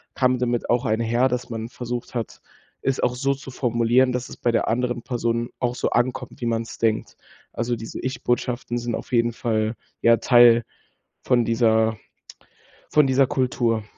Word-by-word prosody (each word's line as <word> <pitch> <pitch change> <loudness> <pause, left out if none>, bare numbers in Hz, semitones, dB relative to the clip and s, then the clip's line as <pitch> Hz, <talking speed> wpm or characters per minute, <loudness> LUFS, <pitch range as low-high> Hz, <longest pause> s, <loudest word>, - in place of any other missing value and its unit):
kam 130 -1 +2
damit 120 -1 -1
auch 120 0 +2
einher, 115 +3 +2
dass 125 -1 -3
man 115 0 -5
versucht 120 0 -6
hat, 115 -3 -4 0.4
es 135 -1 0
auch 125 - +1
so 135 +2 +1
zu 135 -1 -10
formulieren, 125 0 +2
dass 125 0 -3
es - - -10
bei 120 - +1
der 115 - 0
anderen 120 +1 -1
Person 120 -1 -2
auch 120 -1 0
so - - -1
ankommt, 120 +1 -1
wie 120 - -4
man's 115 -1 -2
denkt. 110 -1 -1 0.3
Also, 120 +1 -2
diese 115 0 -7
Ich-Botschaften 120 -1 -2
sind 120 0 -3
auf - - -8
jeden 120 -1 +2
Fall, 110 -1 -1 0.3
ja, 115 0 +5
Teil 120 -1 +6 0.6
von 120 -1 +2
dieser 110 -1 +2 1.0
von 150 -2 +5
dieser 135 0 +3
Kultur. 125 -5 0
120 Hz, 165 wpm, -23 LUFS, 115-125 Hz, 1.0 s, Teil